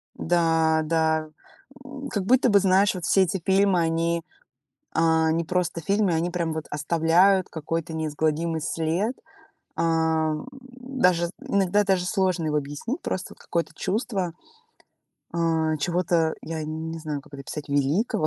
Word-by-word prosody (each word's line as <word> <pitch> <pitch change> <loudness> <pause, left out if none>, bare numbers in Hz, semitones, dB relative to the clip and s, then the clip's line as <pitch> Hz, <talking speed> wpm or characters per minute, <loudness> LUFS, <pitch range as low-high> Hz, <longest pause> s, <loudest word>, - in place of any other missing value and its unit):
Да, 165 -2 +2
да, 160 -1 +1 0.6
м, 275 0 -7
как 200 -6 -2
будто 255 +3 +4
бы 205 -2 +6
знаешь, 195 +1 +3
вот 180 - -4
все 195 - +4
эти 185 0 -2
фильмы, 190 -1 +3
а, - - +2
они 165 +1 0 0.7
не 160 0 +3
просто 180 -1 -1
фильмы, 200 +2 +1
они 165 +2 0
прям 170 -2 -1
вот 160 0 -4
оставляют 170 +5 +3
какой-то 165 +1 -4
неизгладимый 160 +1 -1
след, 165 +9 -1 0.6
а, 160 -1 +1 0.3
даже 250 -10 0
иногда 200 +1 +1
даже 190 -2 +1
сложно 185 -4 0
его 150 -1 0
объяснить, 145 - -4
просто 185 - -3
вот - - -28
какое-то 170 -1 -2
чувство, 195 -4 -2 1.0
а, 160 -2 +1
чего-то, 170 0 +1
я 160 -1 -4
не 160 +1 -5
знаю, 155 -3 -4
как 145 0 -16
это 140 - -7
описать, 145 +3 -7
великого, 145 - +1
165 Hz, 140 wpm, -25 LUFS, 160-190 Hz, 1.0 s, бы